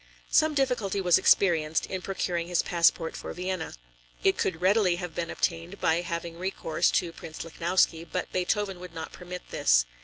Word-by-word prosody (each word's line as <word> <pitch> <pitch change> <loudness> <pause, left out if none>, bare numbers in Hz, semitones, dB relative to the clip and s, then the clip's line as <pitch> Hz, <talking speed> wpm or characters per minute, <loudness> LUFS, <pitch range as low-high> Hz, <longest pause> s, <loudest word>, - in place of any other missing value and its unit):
Some 310 -1 +4
difficulty 245 -8 0
was 180 -3 +4
experienced 160 -5 +3
in 190 -1 -4
procuring 175 -3 -2
his 175 -1 +1
passport 170 -1 +2
for - - -6
Vienna. 185 -2 -4 0.5
It - - +4
could 165 -3 -1
readily 185 0 +3
have 175 -2 -6
been 170 -1 -3
obtained 170 +3 -2
by 160 +2 +2
having 170 -1 -5
recourse 185 -3 0
to 175 -2 0
Prince 160 -1 -8
Lichnowsky, 170 0 +1
but 180 - -3
Beethoven 190 +1 0
would 180 -1 -10
not 160 0 -6
permit 180 0 -8
this. - - +4
175 Hz, 165 wpm, -28 LUFS, 165-185 Hz, 0.5 s, Some